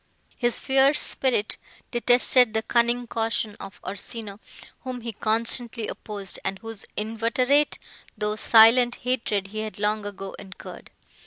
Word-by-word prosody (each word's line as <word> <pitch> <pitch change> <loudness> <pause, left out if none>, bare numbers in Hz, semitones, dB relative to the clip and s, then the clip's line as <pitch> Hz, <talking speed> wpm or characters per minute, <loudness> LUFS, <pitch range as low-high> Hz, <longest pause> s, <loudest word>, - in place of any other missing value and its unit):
His 240 -1 0
fierce 270 +2 +4
spirit 245 -6 +1 0.3
detested 245 -1 +4
the 220 - 0
cunning 240 +1 +1
caution 225 -2 -2
of 195 -1 -10
Orsino, 205 +1 -7 0.4
whom 255 -2 -7
he 230 0 -6
constantly 230 +1 -1
opposed, 200 -3 -5
and 195 0 -3
whose 225 0 -8
inveterate, 230 +7 +1 0.4
though 210 0 -1
silent, 230 +3 +6
hatred 225 -6 -1
he 215 +2 -6
had 215 0 -5
long 210 +1 -1
ago 195 -1 -8
incurred. 190 -1 -11
225 Hz, 130 wpm, -24 LUFS, 210-245 Hz, 0.4 s, silent